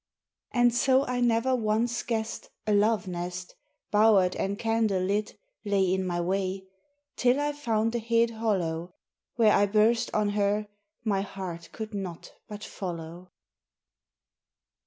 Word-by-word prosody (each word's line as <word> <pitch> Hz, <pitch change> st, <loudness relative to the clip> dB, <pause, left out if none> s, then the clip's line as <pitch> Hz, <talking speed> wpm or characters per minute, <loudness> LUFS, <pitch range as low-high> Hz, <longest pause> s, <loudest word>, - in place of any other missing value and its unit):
And 240 Hz, -1 st, +3 dB
so 260 Hz, +3 st, +3 dB
I 250 Hz, -1 st, -2 dB
never 240 Hz, +2 st, +2 dB
once 230 Hz, +1 st, 0 dB
guessed 225 Hz, -1 st, -3 dB, 0.2 s
A 215 Hz, -, +1 dB
Love 210 Hz, -1 st, +3 dB
nest, 180 Hz, 0 st, -5 dB, 0.4 s
Bowered 205 Hz, -4 st, +4 dB
and 200 Hz, +1 st, -2 dB
candle 225 Hz, -4 st, +1 dB
lit, 205 Hz, +3 st, -1 dB, 0.3 s
lay 195 Hz, -3 st, +2 dB
In 190 Hz, -1 st, -1 dB
my 175 Hz, -1 st, -1 dB
way, 190 Hz, +2 st, -1 dB, 0.5 s
Till 250 Hz, +2 st, +3 dB
I 295 Hz, 0 st, 0 dB
found 230 Hz, -6 st, -1 dB
a 240 Hz, -, 0 dB
hid 230 Hz, +1 st, +2 dB
hollow, 180 Hz, -6 st, -2 dB, 0.4 s
Where 225 Hz, -3 st, +5 dB
I 205 Hz, -, +4 dB
burst 220 Hz, +3 st, +2 dB
on 210 Hz, -1 st, +1 dB
her 205 Hz, +1 st, +1 dB, 0.4 s
my 200 Hz, -3 st, +1 dB
heart 185 Hz, -4 st, -6 dB
could 220 Hz, 0 st, -7 dB
not 185 Hz, -4 st, -6 dB
but 210 Hz, 0 st, -8 dB
follow. 175 Hz, -1 st, -7 dB
210 Hz, 135 wpm, -28 LUFS, 190-230 Hz, 0.5 s, Where